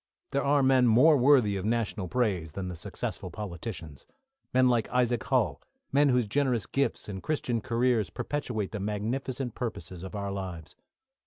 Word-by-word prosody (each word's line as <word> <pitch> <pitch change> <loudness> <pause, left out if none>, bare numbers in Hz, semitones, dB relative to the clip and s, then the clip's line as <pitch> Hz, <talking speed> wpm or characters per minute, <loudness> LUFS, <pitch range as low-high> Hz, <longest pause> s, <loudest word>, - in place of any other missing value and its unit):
There 140 - 0
are 140 0 +3
men 130 -2 +5
more 130 +8 +6
worthy 125 -7 +4
of 95 - -4
national 110 -3 -1
praise 95 -9 -1
than 95 -2 -4
the 90 - -5
successful - - -5
politicians; 85 - -7 0.4
men 130 0 +4
like 120 -3 +2
Isaac 125 -2 +1
Hull; 110 - +1 0.3
men 145 +1 +4
whose 125 -2 +3
generous 125 -2 0
gifts 140 0 -1
and 95 -2 -6
Christian 125 -7 -1
careers 115 -2 +1
perpetuate 120 -9 -3
the 105 - -4
magnificent 120 +5 -3
purposes 95 -8 -5
of 95 +3 -7
our 100 -1 -3
lives. 90 -5 -6
115 Hz, 160 wpm, -28 LUFS, 100-130 Hz, 0.4 s, more